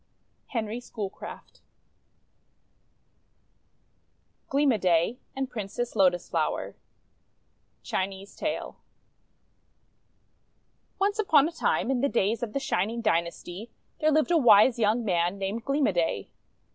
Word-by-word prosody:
HENRY 225 -2 -3
SCHOOLCRAFT 210 -5 -8 2.9
GLEAM 280 0 +3
O' 225 - +2
DAY 180 +5 +1 0.2
AND 270 0 -3
PRINCESS 225 +2 -4
LOTUS 185 -3 +3
FLOWER - - -2 1.1
Chinese 195 +1 -4
Tale - - -4 2.2
ONCE 405 +2 0
upon 310 -8 +5
a - - -5
time, 320 -5 0
in 250 -2 0
the 280 - +2
days 220 -1 0
of 235 -3 -4
the 275 - 0
Shining 225 -1 -1
Dynasty, 175 +1 -2 0.3
there 310 - +3
lived 310 +2 +2
a 335 - +5
wise 235 -1 +6
young 220 +2 +2
man 175 -1 +1
named 200 +4 -3
Gleam 275 +1 +1
o' - - +3
Day. 165 - -1
225 Hz, 115 wpm, -27 LUFS, 195-270 Hz, 2.9 s, wise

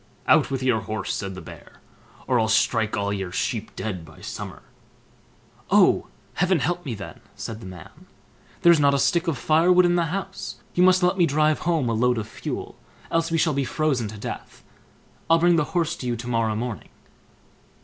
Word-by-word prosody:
"Out - - +4
with 135 -1 -3
your 125 -4 +2
horse", 110 -3 -4
said 95 -2 -4
the 95 - -8
Bear, - - -12 0.5
"or 125 -2 +2
I'll 110 - +2
strike 110 0 +2
all 100 0 -1
your 95 -3 -4
sheep 110 +3 -3
dead 95 -6 -4
by 80 -1 -15
summer." - - -7 1.1
"Oh! - - +4 0.3
heaven 185 +1 +2
help 175 +4 -1
me 120 - -3
then", 95 -6 -9 0.2
said 110 -1 -6
the 95 - -10
man; 90 -4 -12 0.6
"there's 170 -2 +7
not 140 -1 +4
a - - +2
stick 170 +5 +1
of 160 -5 0
firewood 175 +6 +4
in 175 0 +3
the 170 - +2
house; 195 +3 -5 0.2
you 175 - +1
must 185 0 +5
let 180 +2 +2
me 170 - +5
drive 155 +1 +2
home 160 -7 +1
a 115 - 0
load 125 +2 +2
of 110 -1 -3
fuel, 115 - -6 0.3
else 165 0 +1
we 165 - 0
shall 155 -1 +2
be 140 0 0
frozen 135 -5 0
to 105 +1 -8
death. - - -8 0.7
I'll 165 - +6
bring 175 +1 +4
the 160 - +2
horse 165 -1 +1
to 125 - -5
you 120 - 0
to 120 +1 -7
morrow 115 -2 0
morning." 115 -1 -5
130 Hz, 200 wpm, -24 LUFS, 110-165 Hz, 1.1 s, there's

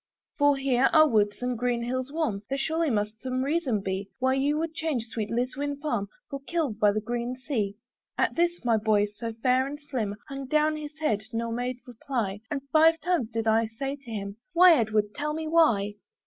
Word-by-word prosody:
"For, 285 -1 +4
here 270 -1 +3
are 310 -1 +7
woods 210 -2 +1
and 250 0 0
green 240 0 -1
hills 255 +2 -3
warm; 300 -11 -1
"There 275 - -1
surely 320 +3 0
must 210 -1 -1
some 255 0 -1
reason 280 -7 0
be 195 +1 -3
"Why 260 0 +2
you 280 +3 +1
would 325 0 -2
change 310 -8 -2
sweet 220 -2 -4
Liswyn 265 +4 -2
farm 235 -9 -1 0.2
"For 275 - -5
Kilve 305 -11 -1
by 210 -1 +5
the 215 - -1
green 240 +3 -3
sea." 235 -7 -2 0.4
At - - +1
this, 345 -4 0
my 230 -2 +4
boy, 210 -1 +3
so 210 +3 -6
fair 255 +4 +1
and 290 +1 -6
slim, 250 -9 -3
Hung 275 -1 -6
down 305 +2 +2
his 305 0 -7
head, 220 -10 0
nor 230 0 -2
made 245 +2 -2
reply; 235 -5 -3
And 280 -2 -3
five 325 +1 +6
times 320 -8 0
did 225 -1 -2
I 225 0 +3
say 270 +5 -4
to 275 -4 -15
him, 200 -2 -5 0.2
"Why? 355 +1 +8
Edward, 215 -6 +1
tell 300 +1 -2
me 320 0 -3
why?" 225 -11 +3
255 Hz, 205 wpm, -27 LUFS, 220-295 Hz, 0.4 s, Why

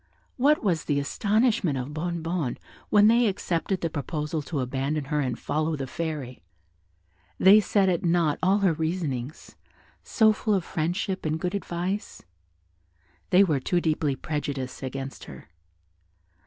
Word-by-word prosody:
What 285 +3 +3
was 175 -7 0
the 145 -2 +1
astonishment 210 - +1
of 130 +3 -5
Bonnebonne 165 -3 -2 0.3
when 210 0 +6
they 235 +1 +4
accepted 185 -1 -1
the 165 - -1
proposal 150 +1 -3
to 145 0 -4
abandon 135 +3 -2
her 150 - +2
and 125 -4 -1
follow 155 +2 -1
the 135 -2 -4
Fairy! 145 -3 -5 1.0
They 200 +3 +7
set 200 -1 +2
at 175 -3 +1
nought 170 -3 +2
all 190 +2 +3
her 175 - +4
reasonings, 155 -5 -4 0.5
so 220 -1 +4
full 215 0 0
of 190 - 0
friendship 175 +3 -2
and 155 0 -1
good 180 +3 -2
advice; 190 +1 -4 1.1
they 190 +2 +6
were 155 -8 +1
too 175 +7 0
deeply 155 -4 0
prejudiced 140 -2 -4
against 135 +1 -6
her. - - -12
165 Hz, 140 wpm, -26 LUFS, 145-190 Hz, 1.1 s, They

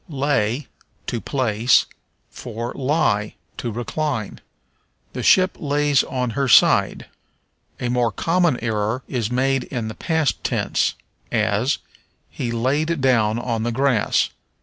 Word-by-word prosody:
Lay 135 -3 0 0.4
(to 120 - -3
place) 120 -3 +2 0.5
for 115 +2 -6
Lie 130 -7 0 0.2
(to 120 - -3
recline). 120 0 -3 0.7
"The - - -4
ship 185 0 +4
lays 145 -2 +2
on 125 -2 -2
her 135 +4 -1
side." 115 - +4 0.7
A 125 - -2
more 120 -1 +1
common 165 - +1
error 110 +2 -1
is 115 -5 -2
made 130 +1 +1
in 115 -4 -4
the - - -6
past 160 +2 -1
tense, - - 0 0.4
as, - - +1 0.5
"He 120 - -3
laid 145 +8 0
down 115 -5 +2
on 120 -2 -2
the 120 +1 -1
grass." 130 -3 +1
125 Hz, 125 wpm, -21 LUFS, 115-140 Hz, 0.7 s, ship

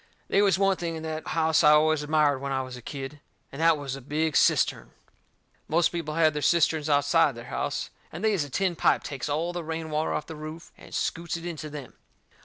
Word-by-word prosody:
They 200 - +4
was 195 -3 +3
one 195 -1 +2
thing 170 -1 -3
in 160 - -6
that 160 0 -5
house 160 -1 +2
I 150 - +7
always 155 0 +4
admired 150 -2 +2
when 140 +1 -4
I 130 -1 0
was 130 -1 -8
a 125 - -10
kid. 135 +3 -7 0.3
And 140 - -6
that 165 -1 +5
was 140 -2 -5
a 135 - -9
big 150 +4 -1
cistern. - - +2 0.7
Most 170 +2 +3
people 165 -3 -4
has 160 -2 +4
their 150 - -3
cisterns 160 -1 +2
outside 145 0 +3
their 120 +1 -10
house, - - -2 0.2
and - - -7
they 215 - +3
is 185 -7 +1
a 145 - -8
tin 185 +5 0
pipe - - +2
takes 140 0 -5
all 165 +4 -1
the 175 -1 -4
rain 160 0 -5
water 155 +1 0
off - - -2
the 160 - -8
roof 155 +2 -9
and - - -15
scoots 170 0 -2
it 165 - -9
into 160 -3 -5
them. 145 -4 -8
155 Hz, 230 wpm, -27 LUFS, 145-165 Hz, 0.7 s, I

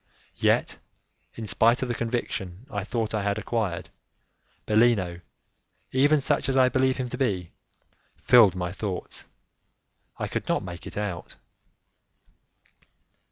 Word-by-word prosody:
Yet, - - +2 0.6
in 115 - -6
spite 115 +6 +3
of - - -2
the 120 - -1
conviction 115 -4 -3
I 100 -2 -2
thought 110 0 -2
I 110 - 0
had 100 +1 -1
acquired, 110 -6 -2 0.8
Bellino, 105 -6 +2 0.7
even 145 +3 +4
such 135 - +1
as 135 - +1
I 130 -1 +5
believe 130 -1 +1
him 130 -1 -2
to - - -6
be, 95 -10 -1 0.6
filled 110 -7 +6
my 90 -1 -3
thoughts; 95 -1 -6 0.9
I - - -3
could - - -4
not - - 0
make 90 -1 -8
it - - -8
out. 100 -5 -4
110 Hz, 130 wpm, -26 LUFS, 95-125 Hz, 0.9 s, filled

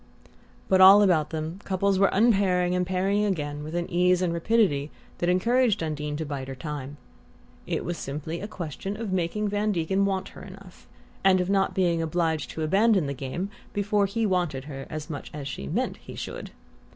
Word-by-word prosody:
But 190 0 +4
all 195 +2 +9
about 160 -6 +3
them 160 +3 -4
couples 195 0 +1
were 195 - +5
unpairing 195 -4 +3
and 180 0 0
pairing 195 +3 +1
again 150 -7 -2
with 155 +2 -6
an 175 0 -1
ease 180 +1 +2
and 170 -2 0
rapidity 170 -6 +1 0.3
that 175 - +1
encouraged 230 +2 +2
Undine 150 -1 -3
to 160 - -3
bide 140 -3 -5
her 135 - -6
time. 145 0 -6 0.7
It - - -2
was 175 0 -3
simply 155 +4 -5
a 205 - -4
question 195 +1 -5
of 215 -5 -3
making 185 +4 -1
Van 205 +1 0
Degen 190 +2 0
want 195 -1 -1
her - - -13
enough, 190 -1 -13 0.4
and 190 -1 +5
of 180 +1 0
not 195 -1 +1
being 175 -3 +2
obliged 160 -4 -1
to 160 - -4
abandon 195 +2 +3
the 140 - -2
game 140 +9 -4 0.2
before 205 0 +1
he 225 +3 -1
wanted 175 -9 0
her 135 -2 -8
as 155 -1 -5
much 150 -4 -6
as 145 -2 -5
she 70 - -6
meant - - -1
he - - -11
should. - - -6
180 Hz, 190 wpm, -26 LUFS, 155-195 Hz, 0.7 s, all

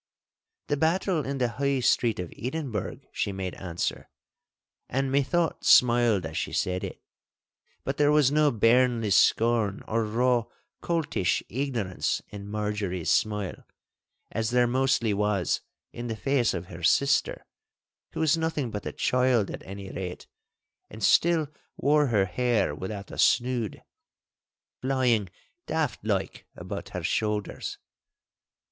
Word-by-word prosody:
'The 145 - -1
battle 165 +1 +1
in 140 0 -2
the 125 -2 +1
High 140 -1 +2
Street 120 -2 +2
of 90 -2 -5
Edinburgh,' 130 -2 -4
she - - -2
made 95 -2 -4
answer, 85 -2 -4 0.8
and 135 +1 -1
methought 145 +4 +1
smiled 120 -6 +5
as 80 - -6
she - - -2
said 90 0 -1
it. - - -6 0.8
But 135 - -3
there 145 0 +4
was 150 -3 +4
no 150 0 +4
bairnly 115 -1 +3
scorn 110 0 +3
or 115 +1 0
raw 120 +2 +1 0.4
coltish 160 - 0
ignorance 120 -7 -1
in 100 -1 -8
Marjorie's 105 -4 -2
smile, 105 -3 0 0.7
as 110 0 -1
there 125 0 +3
mostly 120 -3 +1
was 100 -2 0 0.3
in 120 0 -5
the 115 - -3
face 130 -4 +1
of 85 0 -4
her 85 -1 -10
sister—who 140 +11 -1
was 160 -1 +3
nothing 160 -6 -2
but 105 - -5
a - - -3
child 125 -4 +1
at - - -7
any 95 0 -7
rate, 90 -2 -6 0.6
and - - -9
still 165 -3 +4 0.3
wore 150 0 +3
her 105 -5 +2
hair 120 -3 +1
without 95 +5 -6
a - - -8
snood, 120 -4 +1 1.0
flying 125 -7 +1 0.4
daft 160 -9 -1
like 100 -3 -2
about - - -6
her - - -5
shoulders. 105 -2 -2
120 Hz, 130 wpm, -27 LUFS, 100-135 Hz, 1.0 s, smiled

